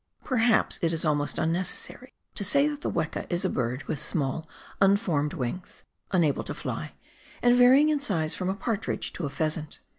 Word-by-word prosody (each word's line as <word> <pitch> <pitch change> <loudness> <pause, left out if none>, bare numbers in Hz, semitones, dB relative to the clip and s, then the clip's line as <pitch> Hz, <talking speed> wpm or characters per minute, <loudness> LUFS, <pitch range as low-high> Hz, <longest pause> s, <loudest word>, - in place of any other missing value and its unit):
Perhaps 240 -3 +2
it 165 -1 +1
is 165 0 -2
almost 145 -1 0
unnecessary 185 +9 -2 0.2
to - - -3
say 280 +9 +3
that 295 -1 -4
the - - -2
weka - - -2
is 175 0 +1
a - - +2
bird 125 +2 -2
with 150 - -3
small 150 +1 -1 0.3
unformed 190 -7 +2
wings, 135 +9 -5 0.3
unable 165 -7 +2
to - - -5
fly, - - -5 0.5
and 245 0 +6
var3'ing 260 +5 +6
in 300 -1 +2
size 165 - 0
from 185 0 -2
a 190 - -1
partridge 220 0 -3
to 165 - -3
a - - -5
pheasant. 155 +1 -2
180 Hz, 180 wpm, -27 LUFS, 155-235 Hz, 0.5 s, and